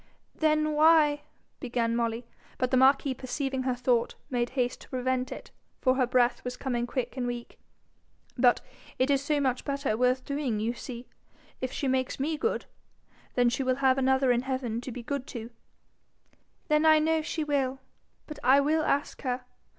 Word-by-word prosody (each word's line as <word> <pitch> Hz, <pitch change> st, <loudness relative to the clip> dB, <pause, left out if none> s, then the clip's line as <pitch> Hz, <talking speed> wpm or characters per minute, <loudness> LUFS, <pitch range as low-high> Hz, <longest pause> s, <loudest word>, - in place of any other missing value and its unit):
'Then 310 Hz, -1 st, +2 dB
why 300 Hz, -1 st, +5 dB, 0.2 s
?' -, -, -41 dB
began 235 Hz, -2 st, -1 dB
Molly; 230 Hz, 0 st, -1 dB, 0.3 s
but 255 Hz, -1 st, -1 dB
the -, -, +3 dB
marquis 270 Hz, +1 st, +4 dB
perceiving 265 Hz, +1 st, -3 dB
her 255 Hz, -1 st, 0 dB
thought, 245 Hz, -1 st, +1 dB, 0.2 s
made 240 Hz, -1 st, 0 dB
haste 245 Hz, -1 st, 0 dB
to -, -, -14 dB
prevent 255 Hz, 0 st, -1 dB
it, -, -, -8 dB, 0.3 s
for 255 Hz, -, +3 dB
her 260 Hz, -1 st, +1 dB
breath 245 Hz, 0 st, +2 dB
was 250 Hz, 0 st, -5 dB
coming 240 Hz, -3 st, -2 dB
quick 250 Hz, -1 st, -3 dB
and 250 Hz, -2 st, -2 dB
weak. 240 Hz, -1 st, -6 dB, 0.8 s
'But 245 Hz, -1 st, +4 dB, 0.4 s
it 260 Hz, +2 st, +2 dB
is 275 Hz, -1 st, +3 dB
so 295 Hz, 0 st, +1 dB
much 260 Hz, -3 st, 0 dB
better 280 Hz, -5 st, -1 dB
worth 250 Hz, +2 st, +1 dB
doing, 280 Hz, -6 st, -2 dB
you 225 Hz, +3 st, -1 dB
see. 240 Hz, 0 st, -8 dB, 0.6 s
If 255 Hz, 0 st, -2 dB
she 275 Hz, -, -2 dB
makes 260 Hz, 0 st, 0 dB
me 310 Hz, +4 st, 0 dB
good, 450 Hz, +10 st, -1 dB, 0.8 s
she 265 Hz, +3 st, -2 dB
will 255 Hz, -1 st, +1 dB
have 265 Hz, 0 st, +3 dB
another 265 Hz, 0 st, +3 dB
in 240 Hz, 0 st, +2 dB
heaven 255 Hz, -3 st, -3 dB
to 255 Hz, -, -6 dB
be 240 Hz, +1 st, -7 dB
good 275 Hz, +1 st, -4 dB
to.' 235 Hz, 0 st, -7 dB, 1.2 s
'Then 300 Hz, 0 st, +3 dB
I 315 Hz, -1 st, +7 dB
know 320 Hz, +1 st, +2 dB
she 315 Hz, 0 st, -3 dB
will. 270 Hz, -3 st, 0 dB, 0.5 s
But 300 Hz, -1 st, -9 dB
I 265 Hz, +2 st, +6 dB
will 305 Hz, +3 st, +2 dB
ask 285 Hz, -1 st, -1 dB
her. 250 Hz, -1 st, -3 dB
260 Hz, 180 wpm, -28 LUFS, 245-280 Hz, 1.2 s, I